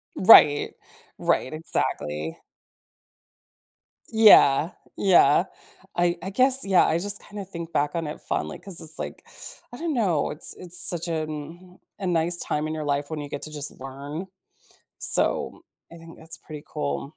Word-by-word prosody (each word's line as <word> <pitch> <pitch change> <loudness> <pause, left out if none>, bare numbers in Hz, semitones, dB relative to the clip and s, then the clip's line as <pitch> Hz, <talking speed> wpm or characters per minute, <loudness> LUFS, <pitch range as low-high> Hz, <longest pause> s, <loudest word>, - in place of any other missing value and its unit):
Right, 150 -7 +7 0.4
right, 130 - 0
exactly. 80 - -3 1.7
Yeah, 190 -8 +6 0.3
yeah, 175 -4 +5 0.5
I 175 0 +1
I 190 - -5
guess 260 +6 +2
yeah, 190 -2 +4
I 160 - +1
just 205 +3 -3
kinda 205 -1 -8
think 170 -3 -8
back 145 -2 0
on 165 -2 -2
it 150 - -7
fondly - - -3
‘cause 195 -4 -6
it's 160 0 -3
like, - - -7 0.5
I 245 - -9
don't 330 +2 -2
know, 190 - +1
it's 150 - -5
it's 180 0 -3
such 175 -1 0
an 160 -2 -2
mm 165 +5 -9 0.2
a 190 - -3
nice 170 0 +1
time 150 -2 -2
in 155 - -4
your 155 -1 -4
life 145 0 -1
when 155 -2 -4
you 145 - -7
get 140 - -6
to 155 - -7
just 145 -1 -4
learn, 140 +6 -7 0.7
so, - - 0 0.3
I - - -10
think 165 0 -13
that's 160 0 -7
pretty 150 -2 -10
cool. 70 - -4
165 Hz, 160 wpm, -25 LUFS, 150-185 Hz, 1.7 s, Right